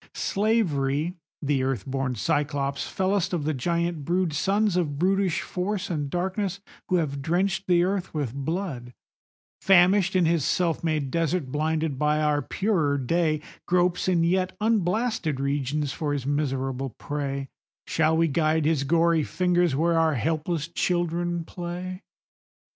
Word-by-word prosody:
Slavery, 170 -8 0 0.3
the 140 -2 +1
earth 130 -1 -1
born 135 -2 -2
Cyclops, 145 +1 -1
fellest 190 -1 0
of 170 -4 0
the 155 +1 0
giant 170 +3 -1
brood, 175 +1 0
Sons 200 +5 +1
of 155 -6 0
brutish 190 +1 +1
Force 190 +1 -3
and 145 -4 -2
Darkness, 190 +3 -2 0.3
who 185 - +2
have 145 -5 -1
drenched 190 +6 0
the 175 -1 +4
earth 190 0 -1
with 145 -7 -3
blood, 140 -4 -4 0.7
Famished 190 0 +5
in 180 -2 +4
his 165 -2 +2
self 170 +1 0
made 155 -5 -1
desert, 165 -3 0
blinded 155 -1 -1
by 150 0 +2
our 150 -1 +2
purer 160 - 0
day, 155 +3 +1 0.3
Gropes 180 0 +2
in 175 -3 +3
yet 185 +2 +1
unblasted 210 - 0
regions 140 +1 -1
for 150 -2 -2
his 140 -3 -3
miserable 135 -2 -1
prey;— 140 -2 -4 0.4
Shall 160 0 +2
we 165 0 +3
guide 155 +1 +1
his 155 -3 +2
gory 165 +2 +3
fingers 175 -2 +1
where 165 +3 +2
our 160 -2 +2
helpless 155 +4 -1
children 175 0 -1
play? 180 +2 -6
165 Hz, 140 wpm, -26 LUFS, 145-180 Hz, 0.7 s, Famished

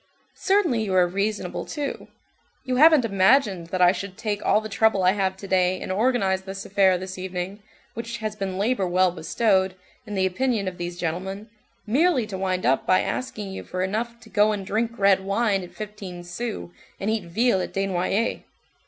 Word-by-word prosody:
Certainly, 355 - +1
you 195 -3 -1
are 180 -1 +6
reasonable, 200 +1 -2
too; 290 -3 -5 0.6
you 255 -1 -1
haven't 305 -3 +7
imagined 195 -2 +3
that 180 +1 +1
I 175 - +7
should 190 0 -6
take 210 -2 -3
all - - +4
the 215 - -6
trouble 215 -2 +2
I 180 - +5
have 190 -1 -1
to 195 - -9
day 185 -1 +2
and - - -5
organized 195 -3 +1
this 195 0 -6
affair 190 -2 +3
this 185 +1 -7
evening, 185 +2 -5 0.3
which 230 +1 -5
has 215 -1 -4
been 195 -3 -4
labor 205 -1 +1
well 180 +1 +3
bestowed, 190 +3 +1 0.3
in 210 - -5
the 190 -1 +2
opinion 210 +2 0
of 180 -1 -5
these 175 0 -4
gentlemen, 190 +5 -4 0.3
merely 270 +2 +2
to 210 -2 -6
wind 185 -1 -1
up 130 +2 +2
by 185 - +4
asking 210 -6 -4
you 190 - -6
for 185 0 -3
enough 230 +5 -3
to 225 - -15
go 210 0 +3
and 200 -2 -4
drink 230 +4 -1
red 195 -1 +4
wine 200 0 +1
at 180 - -9
fifteen 200 -4 -7
sous 180 +2 -5 0.3
and 205 +3 -1
eat 220 -4 -1
veal 195 +3 +2
at - - -4
Desnoyer's. 195 +3 0
195 Hz, 190 wpm, -24 LUFS, 185-220 Hz, 0.6 s, haven't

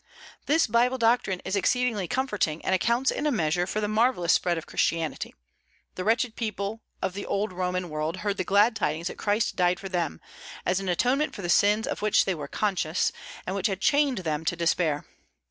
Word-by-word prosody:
This 320 +3 +4
Bible 245 +2 +2
doctrine 225 -6 +1
is 190 - -1
exceedingly 225 -2 +1
comforting, 210 - -1
and 190 - +1
accounts 235 +7 +2
in 300 - -1
a - - +2
measure 175 - +1
for 215 - -2
the 210 - -1
marvellous 215 -5 +2
spread 175 -1 +1
of 165 - -5
Christianity. 165 -3 -1 0.6
The 185 - -4
wretched 225 +2 +1
people 215 -1 -3 0.2
of 185 - -1
the 200 +1 -5
old 200 -1 -1
Roman 180 0 -2
world 155 +2 -3
heard 200 -1 0
the - - 0
glad 205 +5 +4
tidings 165 -1 -1
that - - -9
Christ 210 +1 0
died 180 -1 +2
for 195 - -7
them, 175 -3 -2 0.5
as 180 +1 +1
an 195 -1 -3
atonement 255 - +1
for 200 - -7
the 175 - -3
sins 210 +4 +4
of - - -4
which 210 -1 +3
they 190 - +1
were 150 -4 -6
conscious, 185 -3 0 0.3
and 190 - -3
which 195 - +1
had 195 -2 -3
chained 285 +3 +3
them 155 0 -1
to 175 - +1
despair. 165 -3 0
195 Hz, 200 wpm, -26 LUFS, 175-225 Hz, 0.6 s, This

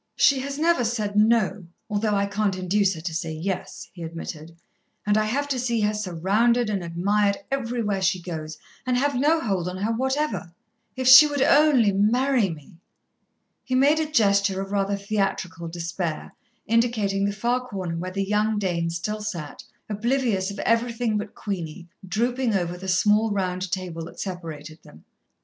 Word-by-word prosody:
"She 275 -2 +4
has 275 +1 -4
never 325 -4 +2
said 215 -3 -2
no, 210 -3 +2 0.2
although 210 0 0
I 200 0 +1
can't 200 -1 -1
induce 190 +1 +1
her 160 - -8
to 165 0 -4
say 160 0 -3
yes," 180 +4 -4
he 175 - -11
admitted; 165 0 -7 0.5
"and 210 0 +2
I 215 0 +2
have 280 +7 -1
to 265 -2 -1
see 235 -2 0
her 210 0 +1
surrounded 210 +5 +1
and 195 -3 -2
admired 200 +4 +1
everywhere 230 -6 -1
she 185 0 +1
goes, 160 -3 -6 0.3
and 255 -1 0
have 285 +2 +1
no 295 +6 +2
hold 190 -6 -1
on 180 - -6
her 205 +4 -1
whatever. 260 - -1 0.4
If 260 -1 -2
she 260 +4 +10
would 285 -2 0
only 285 -9 +5
marry 230 +3 +2
me!" 160 0 -10 0.9
he 260 - -2
made 285 +4 +4
a 310 -1 -2
gesture 200 -6 +3
of 195 0 -5
rather 200 0 0
theatrical 195 -4 -2
despair, 170 -1 -4 0.3
indicating 220 -4 +1
the 200 - 0
far 240 +5 -1
corner 185 -7 -4
where 180 +2 -4
the 195 +1 -2
young 210 +2 +1
Dane 175 -4 -1
still 210 +6 -3
sat, 170 -9 -6 0.2
oblivious 215 -2 0
of 200 - -7
everything 230 0 +1
but 210 0 -7
Queenie, 175 -3 -5 0.2
drooping 235 +4 0
over 175 -2 -1
the 190 +2 -8
small 210 +4 +3
round 185 -2 -2
table 175 -3 -4
that 170 - -12
separated 160 -4 -7
them. 75 +2 -17
205 Hz, 170 wpm, -24 LUFS, 180-235 Hz, 0.9 s, she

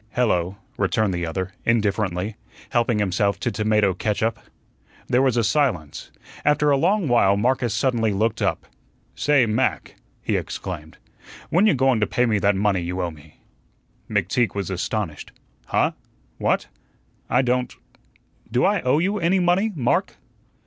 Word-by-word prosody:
"Hello," 95 -6 +1 0.2
returned 100 0 +1
the 85 -1 -2
other, 95 +3 -3
indifferently, 105 -3 0 0.4
helping 120 -1 +1
himself 100 0 0
to - - -1
tomato 105 -1 +2
catsup. 110 +3 -1 0.7
There 125 - +3
was 130 -3 +2
a 115 - +3
silence. 110 - -1 0.3
After 150 0 +3
a - - +5
long 190 +5 +1
while 100 -5 +4
Marcus 125 +2 +1
suddenly 115 -5 +1
looked 110 +3 0
up. - - -1 0.5
"Say, 140 - +3
Mac," 110 0 -1 0.3
he - - 0
exclaimed, 80 -4 -6 0.5
"when 190 +6 +4
you 185 - +4
going 130 -2 +2
to 105 - +1
pay 125 - +1
me 110 -3 +1
that 100 +1 +2
money 100 -2 +1
you 90 +2 -4
owe 90 -2 -1
me?" 75 0 -17 0.7
McTeague 105 +4 0
was 100 -1 -3
astonished. 95 -3 -4 0.3
"Huh? - - +2 0.5
What? - - +1 0.6
I 125 +2 +3
don't 125 0 0 0.8
do 125 +2 +2
I 200 -1 +2
owe 130 +3 +2
you 195 +6 0
any 175 +2 +2
money, 180 +5 +2
Mark?" 125 -5 0
110 Hz, 150 wpm, -23 LUFS, 95-130 Hz, 0.8 s, a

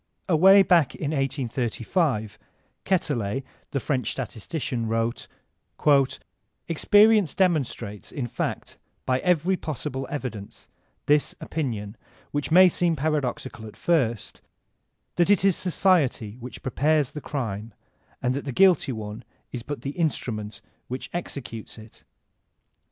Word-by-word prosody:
Away 190 +3 +7
back 170 -7 +3
in 145 -1 -3
1835 125 - -1 0.5
Quetelet, 135 - 0 0.3
the 140 - -1
French 130 -1 -1
statistician, 120 0 -4
wrote: 115 +1 -1 1.4
"Experience 205 +2 +4
demonstrates, 150 - -1
in 135 - -3
fact, 120 - -4 0.3
by 130 0 +1
every 180 +2 +2
pos 155 -8 -5
sible 130 0 -3
evidence, 120 -8 -6 0.4
this 145 0 +2
opinion, 115 -9 -4 0.3
which 145 -1 -2
may 185 +3 +8
seem 175 -1 +1
paradoxical 135 -6 -2
at 105 - -13
first, 125 -11 0 0.8
that 175 +1 +3
it 200 -2 +4
is 195 -3 +4
society 160 - +1
which 125 +1 -9
prepares 145 +2 +1
the 150 - -7
crime, 115 -7 -4 0.5
and 125 - +2
that 140 +2 -4
the 140 - -3
guilty 180 -1 +4
one 110 0 -6 0.3
is 125 - -5
but 145 +4 -6
the 140 - -2
instrument 110 - -3 0.3
which 130 +1 -6
executes 130 -11 -6
it. 110 0 -14
135 Hz, 120 wpm, -25 LUFS, 115-165 Hz, 1.4 s, may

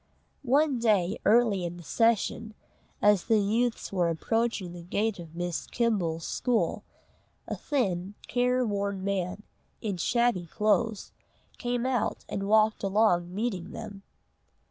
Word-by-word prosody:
One 280 0 +2
day 210 -4 +2
early 215 -4 +4
in 175 0 -4
the 175 - -11
session, 225 +2 +1 0.5
as 205 -3 +4
the 225 -2 +3
youths 220 +2 0
were 175 -3 +2
approaching 215 +1 -1
the 175 - -8
gate 205 +4 -1
of 165 -1 -10
Miss 175 -1 -3
Kimble's 185 -9 0
school, 245 -3 0 0.6
a - - -3
thin, 200 -9 -1
care 250 0 +1
worn 200 -2 -2
man, 195 0 -2 0.4
in 205 -4 -3
shabby 235 -3 +1
clothes, 210 +3 0 0.5
came 245 0 -1
out, 255 -3 -1
and 195 0 -3
walked 215 0 +4
along 195 -4 +2
meeting 205 -5 -3
them. 205 -3 -8
210 Hz, 130 wpm, -28 LUFS, 180-235 Hz, 0.6 s, early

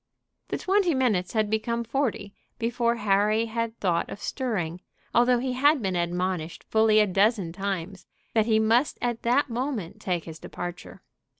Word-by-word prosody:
The - - -2
twenty 375 -4 +2
minutes 215 -9 +1
had 215 -2 +2
become 235 +2 -1
forty 230 -5 -2 0.2
before 235 0 0
Harry 210 +1 +2
had 230 0 -3
thought 175 -4 0
of - - -7
stirring, 180 - -3 0.3
although 245 +1 +4
he 255 +1 -2
had 285 +4 +4
been 190 -5 -2
admonished 175 -1 -2
fully 220 -1 +3
a 210 - +5
dozen 195 -2 +1
times 195 -1 -4 0.3
that 220 -1 +2
he 220 -1 +4
must 225 +5 +2
at 240 -2 -2
that 250 +3 +2
moment 240 - -3
take 175 -3 -1
his 160 -1 -9
departure. 175 0 -8
220 Hz, 160 wpm, -26 LUFS, 185-240 Hz, 0.3 s, a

